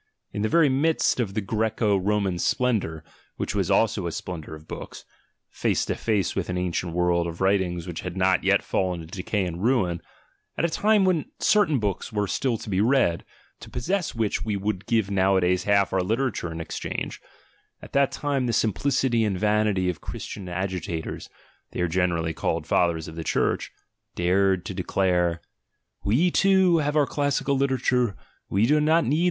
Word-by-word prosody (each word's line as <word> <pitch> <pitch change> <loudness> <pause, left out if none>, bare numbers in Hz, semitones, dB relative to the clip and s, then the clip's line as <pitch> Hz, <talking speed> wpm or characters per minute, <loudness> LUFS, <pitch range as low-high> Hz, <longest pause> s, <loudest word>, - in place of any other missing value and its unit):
In 105 - -3
the 110 - +1
very 165 +2 +5
midst 140 +2 +2
of 100 -5 -2
the 110 - -1
Grseco 110 0 0
Roman 100 -3 0
splendour, 100 -10 0 0.3
which - - -3
was - - 0
also - - +2
a - - -3
splendour 80 -3 -6
of 75 +1 -15
books, - - -8 0.5
face - - 0
to - - -1
face 105 -4 -1
with 95 -2 -2
an 90 - -2
ancient 90 -1 -2
world 85 0 +1
of 85 0 -7
writings 95 -3 +1
which 85 -3 -5
had 90 0 -6
not 95 0 +2
yet 100 +1 +3
fallen 90 -3 -1
into 80 +4 -10
decay 100 +1 -1
and 90 +1 -5
ruin, 95 -9 +1 0.6
at - - +1
a - - +1
time 210 +1 +3
when 180 -5 +2
certain 205 -9 +3
books 105 0 -2
were 105 -1 0
still 120 +4 -1
to - - -10
be 95 -1 +1
read, 115 -8 +2 0.4
to - - -11
possess 185 +4 -2
which 110 -4 -1
we 105 -2 -1
would 100 -1 -3
give 110 -4 +1
nowadays 95 -2 +2
half 100 -2 +3
our 95 - +2
literature 110 -3 -1
in 80 - -6
exchange, 80 - -5 0.6
at - - -13
that 140 -1 +3
time 140 -3 -1
the 120 - 0
simplicity 120 +2 +1
and 100 -4 0
vanity 105 -2 +1
of 90 -4 -2
Christian 95 -3 -7
agitators 90 -2 -4 0.4
(they - - -5
are 90 - +2
generally 85 -2 0
called - - -2
Fathers 85 -2 +1
of 80 - -9
the 80 - -5
Church) - - 0 0.4
dared 95 +1 +2
to 100 - -4
de 95 - -3
clare: 90 -3 +1 0.6
"We 145 - +2
too 190 -3 +4
have 145 0 -1
our 150 -2 +4
classical 145 0 0
literature, 130 -4 +1 0.3
we 100 +3 +2
do 150 +5 +3
Jiot 160 +2 +3
7icr 150 +5 +2
100 Hz, 180 wpm, -25 LUFS, 90-125 Hz, 0.6 s, very